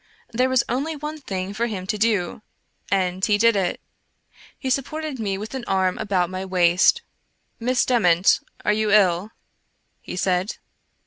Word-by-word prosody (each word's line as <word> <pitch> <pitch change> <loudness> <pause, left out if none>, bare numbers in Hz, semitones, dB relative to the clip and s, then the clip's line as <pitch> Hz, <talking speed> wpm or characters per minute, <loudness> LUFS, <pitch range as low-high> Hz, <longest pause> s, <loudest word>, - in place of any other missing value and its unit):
There 250 +2 +1
was 260 -2 +3
only 280 +7 -2
one 300 +1 -6
thing 190 -5 -4
for 230 +3 -1
him 195 -5 -5
to 205 - -1
do, 210 -3 0 0.5
and 185 -1 0
he 210 -1 +3
did 230 +1 +4
it; 190 -3 0 0.8
he 260 - -3
sup 270 0 +1
ported 310 -4 -5
me 200 -3 -2
with 215 +5 -7
an 260 -2 -4
arm 190 -1 +1
about 185 -4 0
my 185 0 -4
waist. 185 - +3 0.3
'* - - -47
Miss 245 +2 +1
Dement, 185 -7 +4 0.3
are 210 - +3
you 215 0 0
ill?" 195 -2 +3 0.7
he - - -7
said. 185 +2 0
205 Hz, 170 wpm, -23 LUFS, 185-245 Hz, 0.8 s, did